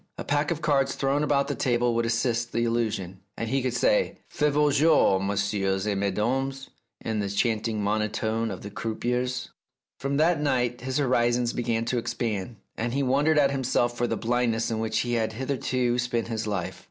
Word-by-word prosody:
A - - -4
pack 145 +1 0
of 165 -2 -3
cards 140 -3 +2
thrown 140 +1 +1
about 140 -2 +2
the - - -1
table 120 -1 +1
would 115 0 +1
assist 115 0 0
the 115 - +1
illusion, 110 -6 -1 0.2
and 115 - -3
he 135 +2 +1
could 125 -1 -1
say, 115 -3 +2
" - - -37
Faites 150 - +3
vos 145 -2 +3
jenx, 150 -12 +4
messieurs 100 -1 0
et 105 - +1
mesdames," 125 +8 -1 0.3
in 110 -1 -2
the 100 -1 -1
chanting 110 +1 0
monotone 110 +2 0
of 95 -3 -6
the 100 - -7
croupiers. 125 +4 -2 0.5
From 140 +1 -1
that 160 0 +3
night 125 -4 0
his 130 +2 -2
horizons 120 -3 +2
began 115 -1 -1
to 120 +1 0
expand, 115 -2 -3 0.2
and 120 +1 -2
he 140 - +1
wondered 145 +4 +2
at 140 -2 +4
himself 125 -3 0
for 120 0 0
the - - -1
blindness 115 -1 0
in 110 - -1
which 110 0 0
he 120 0 -2
had 110 -2 0
hitherto 125 -1 -1
spent 120 -2 -1
his 110 -1 -3
life. 100 -4 -3
120 Hz, 190 wpm, -26 LUFS, 110-135 Hz, 0.5 s, jenx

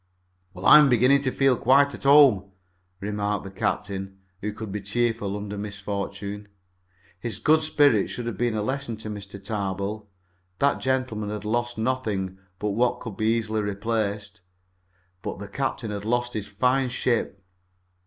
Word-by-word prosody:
"Well, 90 +2 -8
I'm 150 +3 +9
beginning 130 +3 +4
to 130 -2 0
feel 135 -1 +3
quite 140 +4 +4
to - - -8
home," 135 -10 +6 0.5
remarked 105 0 -2
the 95 - -8
captain, 95 0 -3 0.2
who 105 - -2
could 105 -1 -7
be 105 +1 -4
cheerful 105 -1 -1
under 105 0 -5
misfortune. 100 0 -5 0.7
His 115 -2 -4
good 155 +8 +4
spirits 145 -9 +3
should 120 - -5
have 120 -3 -3
been 120 +2 0
a 105 - -1
lesson 130 -1 -3
to 110 0 -7
Mr. 100 -1 -8
Tarbill. 100 0 -3 0.5
That 140 0 +2
gentleman 125 -5 -1
had 105 0 -5
lost 120 +2 -1
nothing 110 -6 -2 0.2
but 105 +2 -2
what 120 +4 +1
could 115 -5 -7
be 110 - -1
easily 110 -1 +1
replaced, 105 -1 -2 0.8
but - - -5
the 100 +1 -7
captain 120 -1 -3
had 100 -1 -4
lost 120 +2 0
his 105 -1 -4
fine 125 +6 +1
ship. 120 -5 -1
110 Hz, 155 wpm, -25 LUFS, 100-120 Hz, 0.8 s, I'm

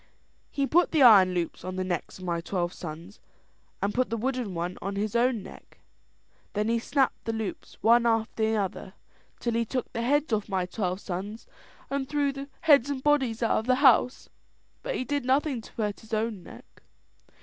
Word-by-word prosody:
"He 280 - -1
put 345 +6 +3
the 310 -4 +3
iron 195 -6 +7
loops 170 -2 -3
on 185 0 -5
the 185 - -1
necks 180 -4 -4
of 185 - -11
my 170 -1 -1
twelve 175 0 -2
sons, 170 +4 -9 0.6
and 205 +1 0
put 255 0 +1
the 230 - -2
wooden 245 -4 -2
one 175 +2 -4
on 195 +1 -4
his 210 +2 -2
own 235 -3 +2
neck. - - -14 0.8
Then 210 +1 0
he 230 0 +2
snapped 270 +3 0
the 225 - -1
loops 220 -3 -5
one 235 +2 +5
after 225 -1 0
another, 205 -3 -2 0.4
till 235 - -1
he 230 0 +1
took 250 +2 -4
the 230 - -2
heads 285 +2 +1
off 210 -1 -1
my 190 -2 0
twelve 185 0 -3
sons 205 +4 -6 0.5
and 275 -1 -2
threw 290 -1 +1
the 275 +1 -8
heads 285 -4 +5
and 270 -2 -3
bodies 265 -6 +2
out 225 - +2
of 220 - -7
the 255 - +4
house; 255 -2 +4 0.5
but - - -3
he - - -1
did 285 +1 -2
nothing 265 0 +1
to - - -14
hurt 210 -3 -3
his 220 0 -5
own 215 -3 -2
neck. - - -15
225 Hz, 195 wpm, -27 LUFS, 195-260 Hz, 0.8 s, iron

